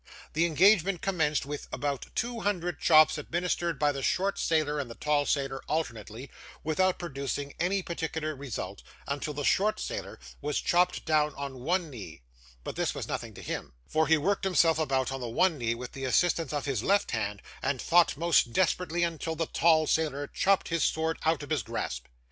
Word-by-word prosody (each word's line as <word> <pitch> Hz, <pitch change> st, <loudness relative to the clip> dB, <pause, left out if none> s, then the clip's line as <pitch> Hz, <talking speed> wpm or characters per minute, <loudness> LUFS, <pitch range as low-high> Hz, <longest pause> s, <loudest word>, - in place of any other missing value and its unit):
The 165 Hz, +2 st, +3 dB
engagement 185 Hz, +2 st, +4 dB
commenced 160 Hz, -7 st, +1 dB
with 145 Hz, 0 st, -6 dB
about 140 Hz, -2 st, -3 dB
two 235 Hz, 0 st, -2 dB
hundred 180 Hz, -6 st, -1 dB
chops 155 Hz, -1 st, +6 dB
administered 170 Hz, 0 st, -1 dB
by 145 Hz, +1 st, +2 dB
the 140 Hz, -1 st, -5 dB
short 195 Hz, +8 st, 0 dB
sailor 155 Hz, -2 st, +1 dB
and 135 Hz, -4 st, -4 dB
the 115 Hz, -, -8 dB
tall 150 Hz, -1 st, +1 dB
sailor 135 Hz, -2 st, -1 dB
alternately, 120 Hz, -5 st, -4 dB, 0.3 s
without 180 Hz, +4 st, +1 dB
producing 140 Hz, -3 st, -4 dB
any 185 Hz, +3 st, +1 dB
particular 160 Hz, -2 st, -3 dB
result, 135 Hz, -4 st, -6 dB, 0.3 s
until 145 Hz, +1 st, -3 dB
the 145 Hz, -, -3 dB
short 210 Hz, +8 st, +2 dB
sailor -, -, -5 dB, 0.2 s
was 150 Hz, 0 st, -1 dB
chopped 180 Hz, +1 st, +1 dB
down 150 Hz, -2 st, +2 dB
on 140 Hz, -2 st, -6 dB
one 170 Hz, +4 st, 0 dB
knee; 90 Hz, -, -9 dB, 0.4 s
but -, -, -5 dB
this -, -, -1 dB
was -, -, -4 dB
nothing -, -, -5 dB
to -, -, -10 dB
him, -, -, -5 dB
for 155 Hz, -1 st, +1 dB
he 160 Hz, +1 st, +5 dB
worked 195 Hz, +8 st, 0 dB
himself 170 Hz, -4 st, +3 dB
about 135 Hz, -4 st, 0 dB
on 135 Hz, -1 st, -4 dB
the 120 Hz, -, -4 dB
one 160 Hz, +6 st, +2 dB
knee 115 Hz, -1 st, 0 dB
with 125 Hz, +1 st, -7 dB
the 135 Hz, -1 st, -5 dB
assistance 165 Hz, +3 st, +2 dB
of 145 Hz, -2 st, -2 dB
his 135 Hz, -7 st, -1 dB
left 200 Hz, -, +2 dB
hand, 105 Hz, -3 st, -2 dB, 0.2 s
and 140 Hz, -2 st, -1 dB
fought 170 Hz, 0 st, +3 dB
most 165 Hz, -7 st, +3 dB
desperately 175 Hz, 0 st, +1 dB
until 165 Hz, -1 st, -2 dB
the 165 Hz, +1 st, -1 dB
tall 160 Hz, -1 st, +3 dB
sailor 150 Hz, -3 st, 0 dB
chopped 195 Hz, +6 st, +1 dB
his 165 Hz, -1 st, +1 dB
sword 160 Hz, +1 st, 0 dB
out 160 Hz, -2 st, +2 dB
of 145 Hz, -, -9 dB
his 155 Hz, -, +2 dB
grasp. -, -, -4 dB
155 Hz, 190 wpm, -29 LUFS, 140-170 Hz, 0.4 s, chops